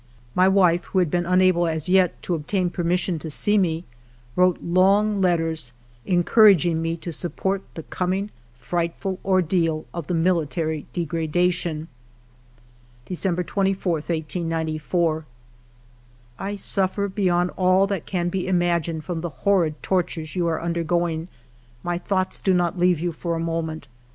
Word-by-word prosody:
My 185 Hz, +1 st, +4 dB
wife, 180 Hz, -3 st, +3 dB
who -, -, -4 dB
had 180 Hz, -5 st, +2 dB
been 175 Hz, -1 st, 0 dB
unable 180 Hz, -1 st, +3 dB
as 160 Hz, -1 st, -2 dB
yet 185 Hz, -1 st, +3 dB
to 180 Hz, -, -1 dB
obtain 175 Hz, +3 st, -1 dB
permission 175 Hz, 0 st, 0 dB
to 160 Hz, -, -6 dB
see 205 Hz, +7 st, +1 dB
me, 170 Hz, -4 st, +1 dB, 0.5 s
wrote 180 Hz, -1 st, +4 dB
long 195 Hz, +4 st, +3 dB
letters 165 Hz, -7 st, 0 dB, 0.3 s
encouraging 175 Hz, -3 st, +5 dB
me 165 Hz, 0 st, -2 dB
to 170 Hz, +1 st, -6 dB
sup 170 Hz, +2 st, -4 dB
port 195 Hz, 0 st, -1 dB
the 160 Hz, -, -6 dB
coming 185 Hz, +6 st, -2 dB, 0.2 s
frightful 170 Hz, +8 st, -3 dB
ordeal 170 Hz, -4 st, +1 dB
of 170 Hz, -4 st, -5 dB
the 180 Hz, -, -1 dB
military 160 Hz, -2 st, 0 dB
degradation. 165 Hz, -1 st, -1 dB, 1.2 s
"December 180 Hz, -1 st, -1 dB
24, 190 Hz, 0 st, 0 dB
1894. 160 Hz, 0 st, -2 dB, 0.5 s
" 120 Hz, 0 st, -31 dB
I 205 Hz, -, -3 dB
suffer 195 Hz, 0 st, 0 dB
beyond 180 Hz, -3 st, +1 dB
all 185 Hz, +1 st, +4 dB
that 195 Hz, -4 st, -3 dB
can 175 Hz, -2 st, -1 dB
be 185 Hz, 0 st, -2 dB
imagined 170 Hz, -3 st, 0 dB
from 175 Hz, -3 st, -3 dB
the 175 Hz, -, -3 dB
horrid 165 Hz, -1 st, 0 dB
tortures 170 Hz, -4 st, -1 dB
you 175 Hz, -2 st, +1 dB
are 160 Hz, -1 st, 0 dB
undergoing; 170 Hz, -1 st, -1 dB, 0.6 s
my 175 Hz, 0 st, -1 dB
thoughts 185 Hz, 0 st, -1 dB
do 190 Hz, -2 st, +2 dB
not 175 Hz, 0 st, +1 dB
leave 180 Hz, -2 st, +3 dB
you 175 Hz, +1 st, -1 dB
for 170 Hz, +1 st, -3 dB
a -, -, -2 dB
moment. 165 Hz, -2 st, -3 dB
175 Hz, 145 wpm, -23 LUFS, 160-185 Hz, 1.2 s, encouraging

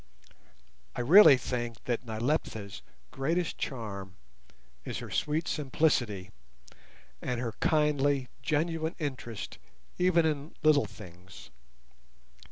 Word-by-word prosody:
I -, -, -2 dB
really 150 Hz, +2 st, +8 dB
think 120 Hz, -1 st, -4 dB
that 120 Hz, 0 st, -2 dB
Nyleptha's 110 Hz, -3 st, -2 dB, 0.3 s
greatest 165 Hz, +5 st, -1 dB
charm 100 Hz, -8 st, -5 dB, 0.7 s
is -, -, -5 dB
her -, -, -7 dB
sweet 155 Hz, +3 st, -1 dB
simplicity, 125 Hz, -, 0 dB, 0.9 s
and 125 Hz, -1 st, -2 dB
her 120 Hz, -2 st, -2 dB
kindly 145 Hz, -3 st, +2 dB
genuine 160 Hz, +2 st, -1 dB
interest 130 Hz, -, -5 dB, 0.4 s
even 180 Hz, -2 st, +4 dB
in 150 Hz, -1 st, -2 dB
little 150 Hz, -6 st, +5 dB
things. 90 Hz, -, -13 dB
135 Hz, 95 wpm, -30 LUFS, 115-155 Hz, 0.9 s, really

